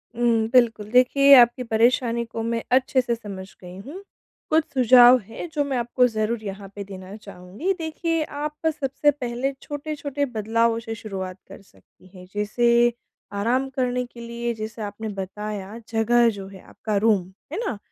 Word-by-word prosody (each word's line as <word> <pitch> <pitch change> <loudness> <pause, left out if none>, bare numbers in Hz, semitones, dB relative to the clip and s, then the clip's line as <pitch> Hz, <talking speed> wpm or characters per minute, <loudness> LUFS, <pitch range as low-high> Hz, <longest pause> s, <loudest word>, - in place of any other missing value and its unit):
हुँ, 230 -2 +2
बिल्कुल। 230 -4 +3
देखिए, 275 +3 +6
आपकी 245 0 +5
परेशानी 235 +1 +2
को 225 0 -6
मैं 230 0 -2
अच्छे 260 +1 +3
से 240 -1 -1
समझ 200 -4 -8
गई 180 0 -10
हूँ। 290 - -9 0.5
कुछ 315 +1 +3
सुझाव 250 -1 +7
हैं, 225 - -8
जो 295 - +1
मैं 270 -2 -2
आपको 245 +1 +2
ज़रूर 220 0 -2
यहाँ 195 -1 -7
पे 205 - -5
देना 190 0 -10
चाहूँगी। 200 - -4
देखिए, 325 0 -1
आप 300 0 -5
सबसे 290 -1 +1
पहले 255 -1 -3
छोटे-छोटे 290 -1 -4
बदलावों 230 -1 0
से 225 -1 -6
शुरुआत 190 -4 -6
कर 195 - -12
सकती 190 -1 -24
हैं। 180 - -11
जैसे 235 +3 +2 0.4
आराम 245 +6 0
करने 250 -1 -1
के 240 0 -15
लिए, 235 0 -3
जैसे 220 0 -7
आपने 210 +1 -5
बताया, 205 +1 -6
जगह 235 +1 +3
जो 200 -3 -6
है, 195 -1 -12
आपका 215 -2 -4
रूम, 210 -2 +3 0.3
है - - -3
ना? 235 - -3
235 Hz, 165 wpm, -23 LUFS, 210-255 Hz, 0.5 s, सुझाव